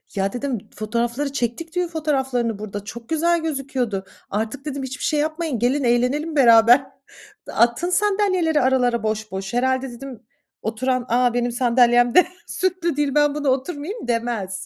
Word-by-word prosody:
Ya, 195 0 -1
dedim, 255 -1 -2 0.2
"Fotoğrafları 235 +6 -2
çektik 280 +7 -3
düğün 360 -1 +1
fotoğraflarını 265 -9 -1
burada, 205 -1 -6
çok 230 +2 -10
güzel 335 +1 +2
gözüküyordu." 265 -10 -3 0.2
Artık 225 +7 -3
dedim, 280 -2 -4
"Hiçbir 265 +2 -6
şey 300 - +1
yapmayın, 310 -4 -2
gelin 260 +4 +1
eğlenelim 255 +6 +1
beraber. 235 0 +7 0.7
Atın 235 +9 +1
sandalyeleri 370 -5 +2
aralara 250 -3 +2
boş 215 -1 -2
boş." 195 +2 -5
Herhâlde 260 +2 0
dedim, 250 0 -9 0.4
oturan 255 +3 -1
"A, 245 0 +2
benim 245 0 0
sandalyem 240 0 +3
de 365 - +7 0.2
süslü 360 -4 -1
değil, 290 -1 0
ben 295 0 +3
buna 290 -2 0
oturmayayım." 290 - -3
demez. 230 -6 -2
255 Hz, 145 wpm, -22 LUFS, 235-295 Hz, 0.7 s, beraber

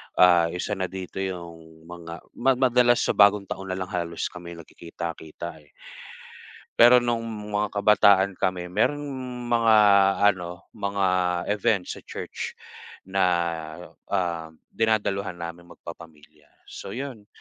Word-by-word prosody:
Ah, 90 -2 +6
isa 90 +3 -3
na 95 - -1
dito 95 0 -7
yung 85 -4 -7
mga 85 -1 -9 0.2
ma 135 +2 +3
madalas 125 -1 +3
sa - - +1
Bagong 100 0 +5
Taon 95 +1 -6
nalang 95 +1 -4
halos 85 -3 -3
kami 85 -1 -9
nagkikita-kita, 85 0 -8
eh. 75 - -27 1.1
Pero 120 +1 +8
nung 120 -1 0 0.3
mga 105 0 0
kabataan 100 -1 +4
kami, 90 -1 -2
merong 145 +9 +1 0.5
mga 115 -2 +5 0.6
ano, 90 0 -9
mga 100 -1 -1 0.5
event 100 -2 +1
sa - - -7
church - - -7 0.5
na, 95 0 0 0.8
um, 85 -3 -2 0.2
dinadaluhan 105 -4 0
naming 85 0 -8
magpapamilya, 75 -3 -13 0.2
so 100 - -9
yun. 125 -6 -7
95 Hz, 120 wpm, -25 LUFS, 85-105 Hz, 1.1 s, Pero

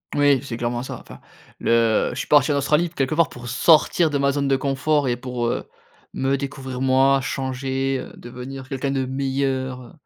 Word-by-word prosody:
Oui, 145 -2 +4
c'est 130 -4 -6
clairement 120 +1 -2
ça. - - -7
Enfin - - -13 0.4
le 115 -1 +2
je 125 - -8
suis - - -4
parti 145 -1 +4
en - - +1
Australie, 150 +5 +2
quelque 135 -4 -1
part, 165 0 +3
pour 125 -1 -9
sortir 160 +4 +4
de 145 - 0
ma 140 0 +2
zone 140 0 -1
de 135 - +3
confort 140 +1 0
et 120 - 0
pour, 125 -1 -3
heu, - - -2 0.5
me 135 +1 0
découvrir 135 -2 -6
moi, 135 +1 +4
changer, 135 0 -2
heu, - - -9
devenir 130 +2 -9
quelqu'un 135 +1 -2
de 135 -1 0
meilleur, 130 -1 -2
heu, 125 - -13
135 Hz, 195 wpm, -22 LUFS, 130-140 Hz, 0.5 s, Oui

